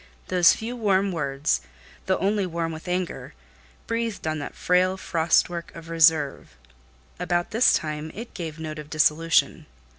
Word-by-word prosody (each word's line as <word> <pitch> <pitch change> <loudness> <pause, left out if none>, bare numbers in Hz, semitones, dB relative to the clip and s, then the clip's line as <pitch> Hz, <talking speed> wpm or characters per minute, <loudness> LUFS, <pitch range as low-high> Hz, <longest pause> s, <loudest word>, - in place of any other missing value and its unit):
Those 180 -2 +6
few 230 +3 -5
warm 200 -4 +1
words, 140 - -1 0.5
though 190 - +2
only 200 0 0
warm 165 -1 -3
with 160 +2 -9
anger, 180 0 -3 0.5
breathed 230 -4 -3
on 155 -1 -1
that 145 - -7
frail 185 +1 +2
frost 165 -3 +2
work 170 -1 -6
of 165 0 -10
reserve; 160 - +2 0.6
about 175 0 -1
this 230 +3 +4
time, 155 0 -2
it 230 +4 -8
gave 165 -4 -6
note 155 -1 -6
of 150 -1 -9
dissolution. 155 +2 +2
170 Hz, 150 wpm, -25 LUFS, 155-190 Hz, 0.6 s, Those